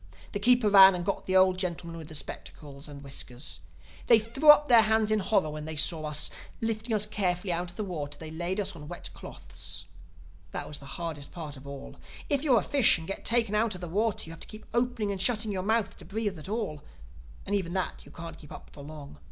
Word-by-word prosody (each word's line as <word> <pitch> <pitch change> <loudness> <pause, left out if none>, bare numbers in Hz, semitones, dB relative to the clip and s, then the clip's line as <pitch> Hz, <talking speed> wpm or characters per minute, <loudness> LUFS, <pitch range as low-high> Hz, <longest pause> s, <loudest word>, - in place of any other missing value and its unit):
The 205 - -3
keeper 245 +1 +5
ran 195 -2 +9
and 175 -1 -3
got - - -2
the 185 - 0
old 185 0 +4
gentlemen 170 -2 -4
with 155 -1 -5
spectacles 145 -1 -7
and 145 -1 -10
whiskers. 125 - -3 0.5
They 230 - +8
threw 235 +8 +1
up 295 0 +9
their 235 -4 +8
hands 220 0 +2
in 215 - +3
horror 190 -5 +1
when 150 0 -6
they 160 0 -4
saw 155 +1 +1
us. 150 -1 0 0.3
Lifting 225 0 -1
us 210 0 +3
carefully 185 -3 -1
out 175 +1 -2
of 175 - -12
the 215 - -3
water 155 -7 -5
they 160 -1 -8
laid 175 +5 -2
us 200 - -2
on 150 -2 -10
wet 175 +2 -7
cloths. 85 0 -6 0.7
That - - -4
was 145 - -8
the 140 - -12
hardest 160 -4 -5
part 155 -4 -6
of 135 +1 -12
all. 140 -1 -9 0.3
If 285 -2 +2
you're 275 -5 +4
a - - +2
fish 275 -10 +5
and 165 -1 -8
get 195 - -4
taken 230 -3 +2
out 215 -1 +1
of 180 - -9
the 175 - -4
water 210 +5 0
you - - -8
have 165 - -10
to - - -9
keep 215 0 -9
opening 240 -3 0
and 195 -2 -3
shutting 220 0 +2
your 190 -2 -2
mouth 220 +2 0
to - - -10
breathe 205 -4 -3
at 155 - -8
all—and 110 - -7
even 180 -4 -1
that 185 -1 -2
you - - -15
can't 165 -1 -9
keep 150 - -13
up - - -11
for 145 - -10
long. 145 - -10
185 Hz, 235 wpm, -29 LUFS, 150-215 Hz, 0.7 s, ran